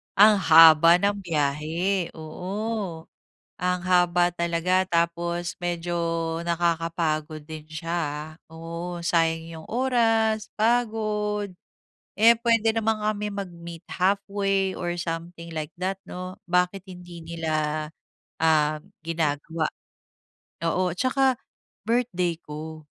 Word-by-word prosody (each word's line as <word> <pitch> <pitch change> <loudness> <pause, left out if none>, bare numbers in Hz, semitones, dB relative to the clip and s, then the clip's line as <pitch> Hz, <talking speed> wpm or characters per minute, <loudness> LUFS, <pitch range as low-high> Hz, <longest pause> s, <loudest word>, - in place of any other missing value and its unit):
Ang 210 +1 +7
haba 165 -1 +8
ng 200 0 +1
biyahe, 165 +3 -1
oo. 185 +2 -4 0.6
Ang 180 -1 0
haba 175 -1 +3
talaga 170 +2 +1
tapos 170 0 -1
medyo 175 0 -2 0.5
nakakapagod 165 -2 -1
din 155 -1 -8
siya, 160 +1 -6
ah. 150 -2 -2 0.2
Oo, 170 +2 -6
sayang 165 -1 +1
'yong 165 -1 -10
oras, 225 -3 +1
pagod. 215 -3 0 0.7
Eh 230 +2 +7
puwede 230 -2 +3
naman 225 -1 +1
kami 210 0 -1
mag-meet 170 -4 -7
halfway 195 0 0
or 175 -1 -2
something 170 0 -5
like 155 -2 -4
that, 190 +1 -2
'no? 185 +1 -7
Bakit 180 +2 +1
hindi 175 -2 -10
nila 155 -2 -2 0.5
ah 155 -1 +3 0.2
ginagawa. 160 0 -1 1.0
Oo, 180 +2 +1
tsaka 260 +3 +2 0.5
birthday 185 -8 0
ko, 155 0 -8
175 Hz, 100 wpm, -25 LUFS, 165-200 Hz, 1.0 s, haba